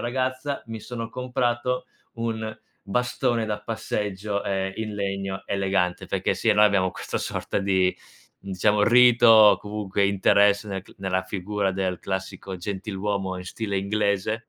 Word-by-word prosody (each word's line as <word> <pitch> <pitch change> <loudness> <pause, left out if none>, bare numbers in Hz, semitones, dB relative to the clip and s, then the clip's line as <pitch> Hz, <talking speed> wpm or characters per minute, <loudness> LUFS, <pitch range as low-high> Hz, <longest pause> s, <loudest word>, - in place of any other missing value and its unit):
ragazza, 130 +3 -2
mi 115 -1 -6
sono 115 0 -6
comprato 125 0 -1 0.3
un 110 -1 -3 0.3
bastone 125 +2 0
da 105 -1 -3
passeggio, 105 -2 -3
ehm, 95 -1 -2
in 110 -1 -4
legno 95 -1 -3
elegante. 95 -2 0
Perché - - 0
sì, - - +1
noi 105 +1 +6
abbiamo 100 -3 +3
questa - - -4
sorta - - -3
di 95 -2 +2 0.5
diciamo 105 +2 +1
rito 120 +1 +6
o 110 -2 +8
comunque 105 -1 -2
interesse 100 +1 +3
nel 95 -2 -4
c - - -18
nella 95 -1 -1
figura 100 +1 -2
del 95 -1 -2
classico 95 0 -5
gentiluomo 95 0 -3
in 90 - -8
stile 100 +1 -3
inglese, 105 +2 -1
105 Hz, 140 wpm, -25 LUFS, 95-115 Hz, 0.5 s, o